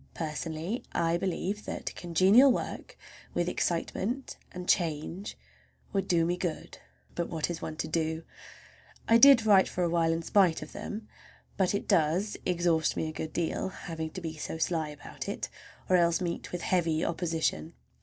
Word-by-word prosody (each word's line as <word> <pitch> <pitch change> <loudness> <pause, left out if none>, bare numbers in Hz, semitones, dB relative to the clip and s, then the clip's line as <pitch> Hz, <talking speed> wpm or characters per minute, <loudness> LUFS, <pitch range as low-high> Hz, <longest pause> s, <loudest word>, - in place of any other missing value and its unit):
Personally, 160 - -3
I 170 0 +2
believe 195 +3 -2
that - - -4
congenial 190 +10 +5
work, - - -4 0.4
with 175 - +1
excitement 195 +9 -2 0.2
and 180 0 -7
change, 170 +3 -1 0.6
would 195 -1 0
do 170 -2 +3
me 175 +1 0
good. 175 -3 -4 0.3
But 170 - -2
what 160 0 -2
is 165 - -5
one 155 - -5
to 155 - -3
do? 160 0 -1 0.8
I 230 0 +6
did 270 -4 +8
write 200 -3 +6
for 180 - -1
a 170 - +2
while 165 -1 +2
in 165 0 -1
spite 180 -3 +3
of - - -11
them; 210 +1 -6 0.5
but 190 0 +1
it - - -3
does 180 +3 +2
exhaust 170 -3 +1
me 160 - -1
a - - -7
good 155 0 -5
deal—having 165 -1 -3
to 185 - -7
be 160 -2 -5
so 160 - -4
sly 160 -2 0
about 150 -1 -8
it, - - -3 0.4
or 185 - +5
else 170 0 +3
meet 175 -2 -4
with 180 - -4
heavy 165 -3 +1
opposition. 160 - -1
170 Hz, 165 wpm, -29 LUFS, 160-190 Hz, 0.8 s, did